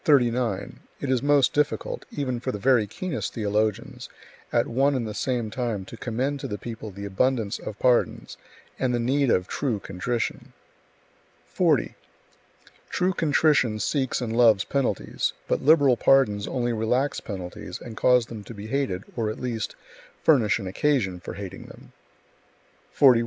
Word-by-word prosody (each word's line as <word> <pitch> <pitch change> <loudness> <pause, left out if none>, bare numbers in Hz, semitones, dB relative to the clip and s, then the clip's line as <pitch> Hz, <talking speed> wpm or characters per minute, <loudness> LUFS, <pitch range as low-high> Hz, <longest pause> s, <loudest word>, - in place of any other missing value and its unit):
It 125 - +1 0.3
is 130 -2 +2
most 145 -1 +3
difficult, 150 0 -1
even 130 -4 -3
for 130 +2 -3
the 105 - -4
very 120 -1 +3
keenest 180 - -4
theologians, 105 -1 -1 0.4
at - - +2
one 135 +4 +2
and 120 -4 -1
the 105 - -5
same 120 -1 -2
time 115 -6 -2
to 115 - -10
commend 130 +5 -2
to 135 - -4
the 105 -4 -4
people 110 -1 -7
the 100 +1 -8
abundance 110 +1 0
of 105 - -7
pardons 125 -2 +1 0.4
and 125 -2 +1
[the - - 0
need 135 +3 +1
of] 90 -4 +2
true 130 -7 -1
contrition. 110 +6 -3 1.0
40. - - +2 1.0
True 185 +1 +1
contrition 150 -8 +2
seeks 130 +4 0
and 115 -2 -2
loves 115 -4 +5
penalties, 140 -2 -1
but - - 0
liberal 140 -3 +5
pardons 105 -8 +3
only 120 -2 -1
relax 125 +6 0
penalties 90 -4 -7
and 115 - -9
cause 125 +1 +4
them 110 -3 -8
to 115 - -9
be 100 +1 -8
hated, 115 -6 -1
or 115 -3 -1
at 110 - -5
least, 115 -4 -3 0.5
furnish 125 -10 +4
an 105 - -6
occasion 95 -2 0
[for 90 - -8
hating 95 -1 -8
them]. - - -14 1.0
41. 130 -4 +6
120 Hz, 155 wpm, -25 LUFS, 105-135 Hz, 1.0 s, 41